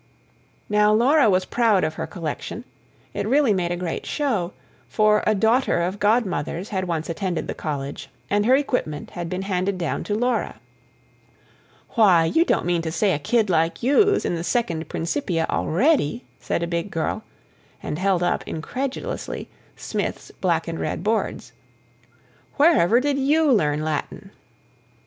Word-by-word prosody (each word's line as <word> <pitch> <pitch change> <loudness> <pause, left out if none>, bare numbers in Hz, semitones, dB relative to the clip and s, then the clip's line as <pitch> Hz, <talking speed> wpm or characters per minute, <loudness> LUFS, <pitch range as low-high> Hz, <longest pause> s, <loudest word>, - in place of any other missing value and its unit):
Now 210 0 +3
Laura 245 +3 +4
was 185 -1 +2
proud 225 -5 +2
of 155 - 0
her - - -5
collection: 175 +6 -5 0.5
it - - -3
really 270 -2 +3
made 180 -3 -1
a - - 0
great 175 -2 -4
show; 225 - -1 0.4
for 215 -1 +3
a 215 - +3
daughter 225 0 +2
of 180 +4 -2
Godmother's 200 -5 0
had 190 -3 -2
once 165 -2 -2
attended 175 +1 -3
the - - -3
College, 140 -2 -5 0.2
and 205 +1 +1
her 255 - +6
equipment 250 - -2
had 175 -1 -5
been 185 +2 -3
handed 190 0 -1
down 170 -3 -2
to 205 - -1
Laura. 245 +3 -1 1.3
"Why, 190 -8 +4
you 325 - +3
don't - - +1
mean 175 -1 +1
to 160 -1 -3
say 190 +3 +1
a 145 - -1
kid 220 +9 +1
like 165 0 0
you's 400 - +3
in - - 0
the 165 -1 -3
Second 175 -7 -1
Principia 170 - -1
already?" 240 - +1 0.2
said 170 - -2
a - - -1
big 170 +3 -2
girl, 170 +5 -2 0.6
and 150 - -4
held 190 -2 +1
up, 175 - 0
incredulously, 255 +12 -4 0.3
Smith's - - -4
black 170 -3 -1
and 165 -1 -4
red - - -3
boards. 210 - -1 1.0
"Wherever 265 - +5
did 280 +1 0
YOU 295 +2 +3
learn 150 - +2
Latin?" 155 -1 -4
190 Hz, 155 wpm, -23 LUFS, 170-235 Hz, 1.3 s, her